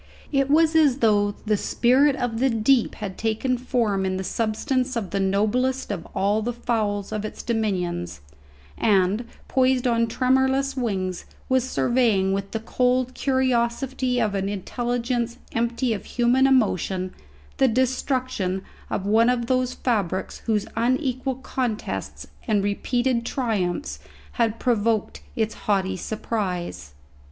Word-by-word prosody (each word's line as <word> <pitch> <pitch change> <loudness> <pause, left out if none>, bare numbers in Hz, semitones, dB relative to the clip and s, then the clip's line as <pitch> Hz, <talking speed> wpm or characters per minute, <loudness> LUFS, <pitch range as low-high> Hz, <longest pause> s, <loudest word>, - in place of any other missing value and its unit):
It 275 -1 +2
was 320 +2 +4
as 295 -5 +5
though 205 -4 +2
the 215 0 +2
spirit 260 +7 +3
of 245 -4 -2
the 265 +2 +3
deep 230 +2 +2
had 200 -4 -6
taken 225 +3 0
form 235 -6 0
in 185 0 -1
the 190 - -3
substance 245 +6 -1
of 215 -5 -3
the 200 - -1
noblest 215 +7 +1
of 180 -5 -5
all 205 +3 +2
the 240 +3 -2
fowls 215 -4 -1
of 215 -1 -3
its 215 - -6
dominions, 180 - -2 0.6
and, 200 +2 +2 0.2
poised 260 -1 +2
on 230 -1 +2
tremorless 265 +3 +1
wings, 190 -8 -2 0.2
was 260 0 +2
surveying 225 -8 +2
with 195 0 -2
the 225 - -4
cold 250 +2 +1
curiosity 255 -1 0
of 215 -3 +1
an 195 0 -1
intelligence 240 +3 -2
empty 235 +1 0
of 205 - -6
human 250 +2 +3
emotion 190 -7 +1 0.4
the 265 - +4
destruction 255 -6 0 0.3
of 195 - -2
one 225 +3 +4
of 245 -1 +1
those 255 0 0
fabrics 200 -7 -1
whose 210 -2 +1
unequal 255 +2 0
contests 250 -4 -4 0.2
and 210 -3 +2
repeated 240 +4 0
triumphs 190 - -2 0.3
had 225 - 0
provoked 225 -3 0
its 220 -1 0
haughty 190 -2 0
surprise. 185 - -4
230 Hz, 135 wpm, -24 LUFS, 205-255 Hz, 0.6 s, as